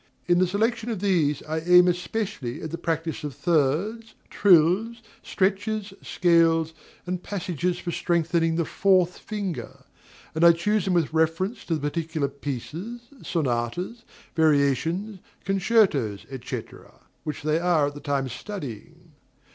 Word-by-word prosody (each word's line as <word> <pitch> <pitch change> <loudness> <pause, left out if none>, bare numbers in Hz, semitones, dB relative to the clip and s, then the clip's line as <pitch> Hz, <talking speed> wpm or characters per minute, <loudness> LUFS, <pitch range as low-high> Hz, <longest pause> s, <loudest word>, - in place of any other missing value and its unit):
In 175 0 +3
the 185 - +3
selection 225 +5 0
of 220 -5 -2
these, 170 -8 +1
I 155 +1 -2
aim 180 +2 +6
especially 180 - -2
at 160 - -5
the 170 - -3
practice 165 -1 -2
of 145 -3 -5
thirds, 175 +9 0 0.2
trills, 195 +5 +4 0.2
stretches, 205 +1 -1
scales, 165 -2 +2 0.3
and 180 0 -3
passages 180 -3 -2
for 175 - -4
strengthening 165 -1 +1
the 170 -1 0
fourth 185 0 +2
finger; 200 -5 -5 0.5
and 160 - 0
I 170 0 +9
choose 205 +4 0
them 185 -2 +1
with 160 -3 +1
reference 165 +7 0
to 165 - 0
the 155 - -4
particular 155 -1 -2
pieces, 145 - -6 0.2
sonatas, 160 - -2 0.3
variations, 160 +6 +1 0.3
concertos, 180 - +2 0.2
&c., 125 -2 -3 0.6
which 150 -1 -5
they 155 +1 +1
are 170 -4 +3
at 145 - -3
the 145 - -9
time 140 -2 -1
studying. 160 - -8
170 Hz, 135 wpm, -25 LUFS, 155-195 Hz, 0.6 s, I